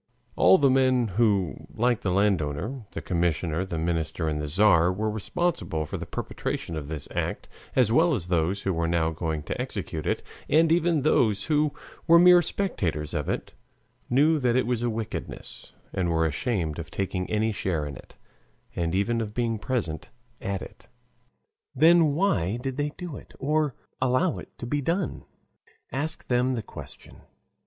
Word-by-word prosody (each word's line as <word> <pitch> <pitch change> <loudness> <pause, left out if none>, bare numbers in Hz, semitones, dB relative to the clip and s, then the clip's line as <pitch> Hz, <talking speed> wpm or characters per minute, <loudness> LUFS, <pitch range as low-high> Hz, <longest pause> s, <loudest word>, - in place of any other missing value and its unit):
All 90 +3 +6
the 140 -2 +4
men 130 -3 +3
who, 100 -3 +1
like 120 0 +1
the 95 - -1
landowner, 100 - 0
the - - -5
commissioner, 85 0 0
the 85 -3 -4
minister, 80 0 -1
and 75 -1 -1
the 75 - -3
Tzar, 90 +1 +4
were 105 +3 -1
responsible 110 - -2
for - - -5
the - - -6
perpetration 85 - -4
of 75 -2 -5
this 75 -2 -5
act, - - -3 0.3
as 125 -4 +4
well 160 +5 +4
as 95 -8 -3
those 90 +3 0
who 95 - 0
were 85 0 0
now 80 -1 +1
going 80 -2 -3
to - - -3
execute 80 -2 -4
it, - - 0 0.3
and 160 +2 +4
even 165 -3 +2
those 110 -9 +3
who 150 -1 +2 0.4
were 170 0 +8
mere 180 0 +8
spectators 90 - -2
of - - -2
it, - - -3 0.6
knew 150 +5 +4
that 125 -3 +2
it 130 - +2
was 120 -1 -1
a 120 - +1
wickedness, 110 -1 -6 0.2
and 90 -2 0
were 80 -1 +2
ashamed 80 - -1
of 80 -2 -6
taking 95 0 -3
any 110 +1 +1
share 85 -7 -1
in 70 -2 -6
it, - - -14 0.6
and 85 0 -1
even 115 +4 +1
of 105 -1 -5
being 115 -2 0
present 105 -11 -3 0.3
at 100 -1 -3
it. - - -13 0.9
Then 160 0 +5
why 135 - +1
did 130 +1 -4
they 145 0 0
do 175 -6 -6
it, - - -14
or 150 0 0 0.3
allow 130 +7 +2
it - - -13
to - - -6
be 145 +4 -1
done? 170 +5 -2 0.7
Ask 155 +4 -3
them 125 +1 +2
the 115 - -3
question. - - -11
110 Hz, 175 wpm, -26 LUFS, 85-135 Hz, 0.9 s, were